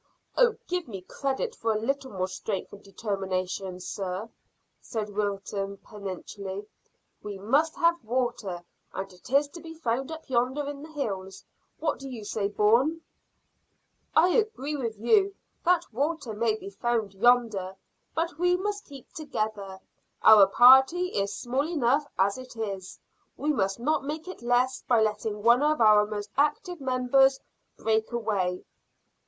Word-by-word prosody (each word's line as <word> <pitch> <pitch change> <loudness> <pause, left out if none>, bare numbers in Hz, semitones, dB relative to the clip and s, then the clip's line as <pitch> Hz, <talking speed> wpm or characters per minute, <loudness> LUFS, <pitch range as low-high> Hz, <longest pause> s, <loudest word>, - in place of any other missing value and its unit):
"Oh! 480 -3 +4
give 360 -3 -2
me 195 -5 -7
credit 275 - -3
for 225 -1 0
a 215 - -1
little 270 +4 -2
more 185 -2 -2
strength 190 +1 -4
and 205 - -11
determination, 190 -2 -3
sir," 190 +3 -5 0.5
said 215 -3 -4
Wilton 200 -1 -2
petulantly. 200 0 -7 0.6
"We 205 -1 -6
must 280 - +1
have 335 -3 +2
water, 220 -7 -2 0.3
and 190 0 -5
it 180 +6 -15
is 280 +3 +4
to 340 +3 -11
be 325 -1 -9
found 270 -2 -2
up 320 0 -8
yonder 260 +3 0
in 285 -1 -6
the 315 +1 -10
hills. 195 -10 -4 0.3
What 320 - -1
do 270 0 -7
you 230 -5 -7
say, 205 -1 -1
Bourne?" 235 +11 +2 1.1
"I 335 +3 +6
agree 360 - 0
with 230 -6 -3
you 390 - +3 0.3
that 350 -5 +2
water 285 -1 -1
may 220 0 +1
be 200 -2 -9
found 220 -1 -1
yonder, 215 -3 +2 0.4
but 330 0 -2
we 355 0 +3
must 410 +2 -3
keep 275 -3 -13
together. 215 -10 -4 0.4
Our 210 -3 +9
party 265 - +6
is 200 - -2
small 260 +5 -1
enough 290 -2 +1
as 200 +5 +2
it 255 -1 -11
is; 195 -4 -5 0.4
we 300 +1 0
must 195 -5 0
not 290 +4 +1
make 305 +4 -5
it 370 - -8
less 245 +2 +1
by 240 -2 +2
letting 210 -1 -1
one 235 +3 +6
of 305 +1 +2
our 210 -2 +6
most 210 -1 -5
active 300 +3 0
members 265 +1 +3 0.4
break 220 +1 0
away." 200 -6 -1
235 Hz, 150 wpm, -27 LUFS, 200-290 Hz, 1.1 s, Our